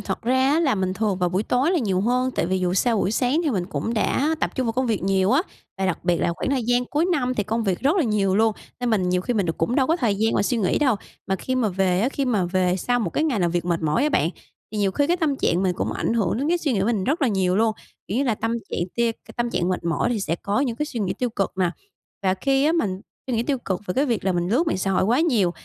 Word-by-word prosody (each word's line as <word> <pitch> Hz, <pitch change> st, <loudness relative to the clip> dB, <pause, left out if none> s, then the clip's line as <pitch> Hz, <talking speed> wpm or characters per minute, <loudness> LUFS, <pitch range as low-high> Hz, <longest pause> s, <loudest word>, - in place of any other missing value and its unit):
thật -, -, -4 dB
ra 260 Hz, +3 st, +2 dB
á, 325 Hz, -, +3 dB
là 275 Hz, -8 st, +2 dB
mình 185 Hz, -1 st, -1 dB
thường 205 Hz, -3 st, -1 dB
vào 180 Hz, -1 st, +1 dB
buổi 190 Hz, +4 st, 0 dB
tối 255 Hz, +8 st, +1 dB
là 360 Hz, -, +2 dB
nhiều 195 Hz, -7 st, 0 dB
hơn 250 Hz, +4 st, +1 dB
tại 170 Hz, -, -1 dB
vì 190 Hz, +1 st, 0 dB
dù 180 Hz, 0 st, 0 dB
sao 230 Hz, +3 st, +2 dB
buổi 195 Hz, -, +1 dB
sáng 255 Hz, +7 st, +1 dB
thì 300 Hz, -, +1 dB
mình 185 Hz, -7 st, -1 dB
cũng 225 Hz, +4 st, -3 dB
đã 290 Hz, +8 st, +1 dB
tập -, -, 0 dB
trung 260 Hz, -3 st, -1 dB
vào 225 Hz, -, 0 dB
công 255 Hz, +2 st, 0 dB
việc 220 Hz, -6 st, -1 dB
nhiều 190 Hz, 0 st, +2 dB
á, 300 Hz, +6 st, +4 dB, 0.4 s
và 190 Hz, -, 0 dB
đặc 185 Hz, -, -1 dB
biệt 175 Hz, -1 st, +2 dB
là 170 Hz, -, +1 dB
khoảng -, -, -2 dB
thời 265 Hz, -3 st, +1 dB
gian 245 Hz, +1 st, +2 dB
cuối 305 Hz, +7 st, 0 dB
năm 255 Hz, -5 st, 0 dB
thì 210 Hz, -, 0 dB
công 225 Hz, +3 st, -1 dB
việc 190 Hz, -3 st, 0 dB
rất 290 Hz, +8 st, +2 dB
là 350 Hz, -, +3 dB
nhiều 200 Hz, -5 st, +1 dB
luôn 220 Hz, 0 st, +3 dB, 0.3 s
nên 245 Hz, -1 st, 0 dB
mình 185 Hz, -5 st, +1 dB
nhiều 180 Hz, 0 st, +1 dB
khi 240 Hz, +6 st, -2 dB
mình 200 Hz, -4 st, +1 dB
được 165 Hz, -, -3 dB
cũng 200 Hz, +10 st, 0 dB
đâu 265 Hz, -3 st, +3 dB
có 325 Hz, +4 st, +2 dB
thời 230 Hz, -, +1 dB
gian 220 Hz, +3 st, +1 dB
mà -, -, +2 dB
suy 240 Hz, +3 st, 0 dB
nghĩ 195 Hz, -5 st, +1 dB
đâu. 260 Hz, -8 st, +2 dB, 0.3 s
Mà 190 Hz, -, 0 dB
khi 255 Hz, +6 st, -3 dB
mà 240 Hz, -4 st, +1 dB
về 185 Hz, -1 st, +1 dB
á, 240 Hz, -, +2 dB
khi 275 Hz, -1 st, -2 dB
mà 215 Hz, -8 st, +1 dB
về 180 Hz, 0 st, +1 dB
sau 245 Hz, +6 st, 0 dB
một 220 Hz, -, -1 dB
cái 310 Hz, -, 0 dB
ngày 265 Hz, -9 st, 0 dB
nào 175 Hz, -2 st, +2 dB
việc 175 Hz, 0 st, -1 dB
mệt 170 Hz, -2 st, -1 dB
mỏi 155 Hz, -, +1 dB
á 300 Hz, -, +3 dB
bạn, 165 Hz, -, +1 dB, 0.4 s
thì 215 Hz, -, -3 dB
nhiều 200 Hz, -2 st, +2 dB
khi 285 Hz, +8 st, +1 dB
cái 350 Hz, +2 st, +2 dB
tâm 310 Hz, -5 st, 0 dB
trạng 180 Hz, -6 st, +1 dB
mình 185 Hz, -, +2 dB
cũng -, -, -2 dB
ảnh -, -, -1 dB
hưởng 220 Hz, -1 st, 0 dB
đến 285 Hz, +3 st, -1 dB
cái 350 Hz, +1 st, +2 dB
suy 295 Hz, -5 st, -1 dB
nghĩ 200 Hz, -, 0 dB
mình 205 Hz, -3 st, 0 dB
rất 305 Hz, +4 st, 0 dB
là 270 Hz, -, +4 dB
nhiều 190 Hz, -3 st, +1 dB
luôn, 225 Hz, 0 st, +3 dB, 0.4 s
kiểu 205 Hz, -, -2 dB
như 280 Hz, -, +1 dB
là, 235 Hz, -4 st, +1 dB
tâm 225 Hz, +2 st, -2 dB, 0.2 s
trạng -, -, -2 dB, 0.2 s
tia 235 Hz, -1 st, +2 dB
c -, -, -17 dB
tâm 240 Hz, -1 st, -1 dB
trạng 175 Hz, -5 st, 0 dB
mệt 180 Hz, -2 st, -2 dB
mỏi 170 Hz, +7 st, 0 dB
thì 215 Hz, -, -2 dB
sẽ 165 Hz, -2 st, -1 dB
có 200 Hz, +5 st, -1 dB
những 245 Hz, -5 st, -1 dB
cái 300 Hz, -, -2 dB
suy 245 Hz, -7 st, -5 dB
nghĩ 195 Hz, -3 st, 0 dB
tiêu 250 Hz, -2 st, -1 dB
cực 195 Hz, -3 st, -2 dB
nè. 180 Hz, -2 st, +2 dB, 0.5 s
Và 190 Hz, -1 st, +2 dB
khi 270 Hz, +6 st, +1 dB
á, 315 Hz, -, +3 dB
mình 195 Hz, -, -1 dB, 0.3 s
suy 250 Hz, -3 st, -1 dB
nghĩ 230 Hz, -, +1 dB
tiêu 275 Hz, 0 st, -1 dB
cực 190 Hz, -6 st, -3 dB
về 180 Hz, -, -2 dB
cái 275 Hz, -, +2 dB
việc 235 Hz, -6 st, -1 dB
là 190 Hz, -, +2 dB
mình 175 Hz, 0 st, -1 dB
lướt 270 Hz, -, +2 dB
mạng 320 Hz, -, 0 dB
xã 195 Hz, +1 st, -1 dB
hội 185 Hz, -, +2 dB
quá 240 Hz, +9 st, +2 dB
nhiều, 235 Hz, -, +2 dB
220 Hz, 320 wpm, -23 LUFS, 185-260 Hz, 0.5 s, á